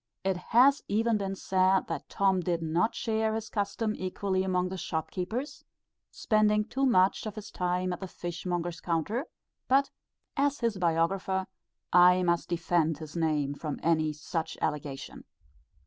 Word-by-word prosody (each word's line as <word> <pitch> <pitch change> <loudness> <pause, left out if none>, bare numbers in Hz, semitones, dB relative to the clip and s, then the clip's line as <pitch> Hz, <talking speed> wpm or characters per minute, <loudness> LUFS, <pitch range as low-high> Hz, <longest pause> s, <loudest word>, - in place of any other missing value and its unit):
It 190 0 +1
has 250 +9 +4
even 225 +2 +2
been 195 -1 -2
said, 190 0 +2
that - - -5
Tom 195 -1 +2
did 175 -2 -1
not 170 +7 +1
share 220 -2 0
his 220 0 -5
custom 210 +1 -1
equally 185 +1 -1
among 185 -1 0
the 190 - -5
shop 160 -3 -3
keepers, 225 - -4 0.5
spending 210 -1 +2
too 265 +4 0
much 195 -1 +3
of 210 - -6
his 210 -1 -8
time 180 0 -1
at - - -6
the 190 - -5
fish 175 -1 -6
monger's 175 -2 -2
counter; 195 - -1 0.4
but, 275 +1 +3 0.4
as 285 0 +1
his 230 -4 0
biographer, 185 +3 +1 0.5
I 180 +1 +7
must 170 -1 +1
defend 165 -2 +1
his 155 0 -9
name 150 -4 0
from 150 0 -5
any 155 -2 +2
such 160 +2 -4
allegation. 145 -3 -4
185 Hz, 155 wpm, -29 LUFS, 170-215 Hz, 0.5 s, I